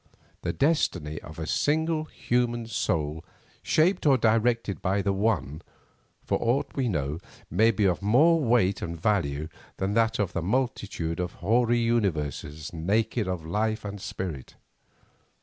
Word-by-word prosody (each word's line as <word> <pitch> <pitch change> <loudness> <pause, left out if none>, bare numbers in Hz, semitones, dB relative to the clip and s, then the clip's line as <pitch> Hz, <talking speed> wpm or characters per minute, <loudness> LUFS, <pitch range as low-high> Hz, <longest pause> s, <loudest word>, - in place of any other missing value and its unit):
The - - -1
destiny 90 - 0
of 80 - -11
a 80 - -4
single 155 - +1
human 120 -4 -1
soul 80 -8 -1 0.4
shaped 170 +1 +2
or 135 -2 +6
directed 115 -2 +1
by 95 +1 0
the 100 - +1
one, 95 -7 0 0.6
for - - 0
aught 120 +4 +1
we 130 -3 0
know, 75 -3 -2 0.3
may 110 +1 +4
be 105 -2 +1
of 90 -1 +1
more 145 +11 +5
weight 115 -6 +2
and 85 -1 -5
value 80 -7 0 0.3
than 95 +1 -1
that 115 0 +2
of 95 -4 -1
a - - 0
multitude 100 -6 -2
of 90 -1 -2
hoary 120 +5 +2
universes 80 - -1
naked 105 +6 0
of 90 -4 -3
life 110 +5 -1
and 100 -1 -6
spirit. 85 -11 -6
105 Hz, 145 wpm, -27 LUFS, 85-120 Hz, 0.6 s, or